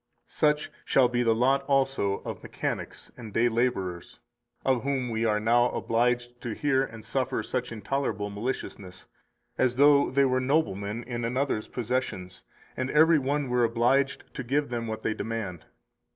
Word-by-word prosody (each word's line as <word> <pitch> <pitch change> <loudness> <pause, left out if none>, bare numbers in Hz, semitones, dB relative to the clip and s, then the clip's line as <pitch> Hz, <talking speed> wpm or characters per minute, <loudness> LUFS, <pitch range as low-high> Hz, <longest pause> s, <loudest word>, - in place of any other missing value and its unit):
237 150 0 +2
Such - - -16
shall 130 -2 +4
be 120 0 0
the 115 -2 +3
lot 135 +4 +3
also 135 -8 +1
of - - -5
mechanics - - -5
and 115 -3 -9
day 120 +2 +3
laborers 110 -7 -2 0.5
of 130 -3 +2
whom 135 -3 -1
we 115 +1 0
are 105 -1 +2
now 120 +3 +3
obliged 120 +1 0
to 120 -3 -4
hear 135 -2 +2
and 115 -4 -8
suffer 125 -2 -1
such 125 +1 -3
intolerable 105 -2 -2
maliciousness, 100 -4 -5 0.5
as 125 -1 +2
though 140 +1 +5
they 140 +1 +3
were 130 -1 +1
noblemen 120 -6 0
in 120 -1 -4
another's 125 -1 -1
possessions, 115 -7 -3 0.3
and 130 +1 -2
every 160 +2 +5
one 140 +1 -1
were 125 -1 +2
obliged 125 +4 +2
to 140 - -5
give 140 +4 0
them 120 -1 -3
what 110 0 -5
they 110 - 0
demand. 110 -7 -5
120 Hz, 165 wpm, -27 LUFS, 110-135 Hz, 0.5 s, though